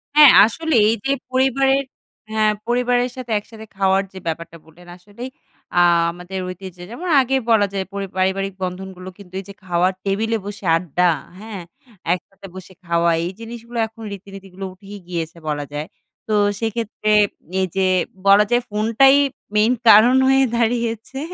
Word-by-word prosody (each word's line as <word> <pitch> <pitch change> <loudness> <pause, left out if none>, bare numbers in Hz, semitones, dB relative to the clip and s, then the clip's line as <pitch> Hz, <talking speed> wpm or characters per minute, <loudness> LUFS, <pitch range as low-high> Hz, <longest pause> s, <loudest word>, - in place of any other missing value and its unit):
হ্যাঁ 300 -3 +9
আসলেই 305 +1 +1
এই 225 - +2
যে 275 - +1 0.2
পরিবারের 270 +1 +2 0.5
হ্যাঁ 215 -1 +2
পরিবারের 245 +1 +1
সাথে 255 -3 -7
একসাথে 220 +1 -13
খাওয়ার 195 0 +2
যে 190 - -8
ব্যাপারটা 165 0 -5
বললেন। 175 +2 -18
আসলেই, 205 +7 -9 0.5
আ - - +6 0.3
আমাদের 180 +2 -7
ঐতিহ্যে 185 -1 -9
যেমন 340 +10 -6
আগে 265 +1 0 0.2
বলা 210 -3 +4
যায় 190 -1 -2
পরি 200 -1 -4
পারিবারিক 190 +1 0
বন্ধনগুলো 185 0 -6
কিন্তু 185 -3 -15
এই 195 - -9
যে - - -8
খাওয়ার 180 +1 +1
টেবিলে 220 +3 0
বসে 205 -1 -8
আড্ডা, 175 +1 +1 0.3
হ্যাঁ? 210 -3 -8 0.5
একসাথে 195 +2 -8
বসে 185 0 -11
খাওয়া। 170 0 +2
এই 175 - -3
জিনিসগুলো 235 +1 -9
এখন 225 +1 -16
রীতিনীতিগুলো 195 -1 -10
উঠেই 200 +1 -11
গিয়েছে 170 -2 -4
বলা 145 -1 -2
যায়। 150 +2 -4 0.4
তো 215 - 0 0.2
সেক্ষেত্রে 225 -1 -2 0.5
এই 185 - +1
যে 190 -1 +2 0.4
বলা 200 +1 +7
যায় 240 0 +3
ফোনটাই 225 +6 +4 0.4
মেইন 220 +4 +4
কারণ 225 +4 +8
হয়ে 270 0 +4
দাঁড়িয়েছে। 235 +1 -1
205 Hz, 150 wpm, -20 LUFS, 185-235 Hz, 0.5 s, হ্যাঁ